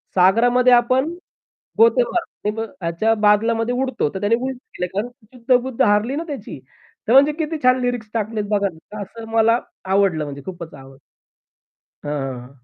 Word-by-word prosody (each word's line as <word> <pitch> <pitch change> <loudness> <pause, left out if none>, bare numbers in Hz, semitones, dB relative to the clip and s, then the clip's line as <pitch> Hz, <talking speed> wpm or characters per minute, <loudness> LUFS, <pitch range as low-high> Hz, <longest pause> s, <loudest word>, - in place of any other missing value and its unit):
सागरामध्ये 245 +7 +4
आपण 255 +5 +3 0.7
गोते 230 +2 +5
मारतो 225 - -3 0.2
ह्याच्या 170 +7 0
बादलामध्ये 225 +3 +2
उडतो 255 - -1
तर 190 - -4
त्याने 205 +3 +2
उलट 260 +2 -4 0.2
केलं 180 - -2
कारण 215 +5 -2 0.2
शुद्ध-बुद्ध 250 +1 0
हारली 210 +7 +2
ना, 330 - -3
त्याची 290 -3 -7 0.5
तर - - +3
म्हणजे 280 +3 +6
किती 315 +1 -3
छान 255 0 +4
लिरिक्स 245 -3 -2
टाकलेत 215 -1 -2
बघा 200 -1 +1 0.3
असं 225 +3 -10
मला 225 +1 +3 0.4
आवडलं 185 -6 +2
म्हणजे 140 -1 -8
खूपच 170 -4 -8
आवडलं. 135 -1 -14 1.1
हां, 150 -1 -2
हां, 125 - -7
हां. 125 - -13
225 Hz, 150 wpm, -20 LUFS, 200-250 Hz, 1.1 s, म्हणजे